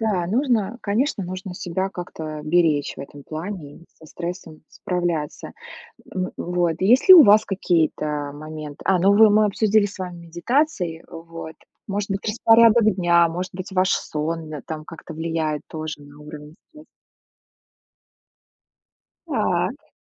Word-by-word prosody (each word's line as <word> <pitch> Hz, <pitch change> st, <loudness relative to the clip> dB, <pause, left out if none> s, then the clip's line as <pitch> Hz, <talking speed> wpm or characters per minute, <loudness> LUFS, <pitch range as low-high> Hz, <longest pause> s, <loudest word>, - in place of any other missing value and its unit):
Да, 200 Hz, -6 st, 0 dB
нужно, 235 Hz, 0 st, 0 dB
конечно, 215 Hz, +2 st, 0 dB
нужно 185 Hz, +1 st, -7 dB
себя 185 Hz, +2 st, -3 dB
как-то 160 Hz, -4 st, -7 dB
беречь 155 Hz, -2 st, +1 dB
в -, -, -8 dB
этом 140 Hz, +1 st, -10 dB
плане 155 Hz, -1 st, -7 dB
и 170 Hz, -, -18 dB
со 160 Hz, -, -15 dB
стрессом 170 Hz, -1 st, -7 dB
справляться, 175 Hz, -6 st, -3 dB, 0.6 s
м 185 Hz, 0 st, -2 dB
Вот. 175 Hz, -2 st, -1 dB
Есть 235 Hz, -, +3 dB
ли 375 Hz, -, +13 dB
у 340 Hz, -, +10 dB
вас 210 Hz, +1 st, +6 dB
какие-то 155 Hz, -6 st, -1 dB
моменты? 155 Hz, -1 st, -9 dB
А, 190 Hz, -1 st, +3 dB
ну, 195 Hz, +3 st, +4 dB
вы 220 Hz, 0 st, +7 dB
мы 210 Hz, +1 st, +4 dB
обсудили 210 Hz, 0 st, +2 dB
с 200 Hz, -, -11 dB
вами 175 Hz, -2 st, -7 dB
медитации. 175 Hz, -, -1 dB
Вот. 165 Hz, -1 st, -9 dB, 0.3 s
Может 205 Hz, +1 st, -3 dB
быть, 195 Hz, 0 st, -1 dB
распорядок 225 Hz, -1 st, +5 dB
дня, 170 Hz, -2 st, +4 dB
может 180 Hz, +3 st, -5 dB
быть, 185 Hz, +1 st, -7 dB
ваш 185 Hz, 0 st, +2 dB
сон 160 Hz, +1 st, -3 dB
на 150 Hz, -2 st, -6 dB
там 155 Hz, -1 st, -7 dB
как-то 165 Hz, 0 st, -10 dB
влияет 160 Hz, -2 st, -2 dB
тоже 155 Hz, -1 st, -5 dB
на 145 Hz, 0 st, -15 dB
уровень 150 Hz, 0 st, -11 dB, 0.2 s
стресса. 310 Hz, -1 st, -16 dB, 2.4 s
Так. -, -, -2 dB
175 Hz, 145 wpm, -22 LUFS, 155-205 Hz, 2.4 s, ли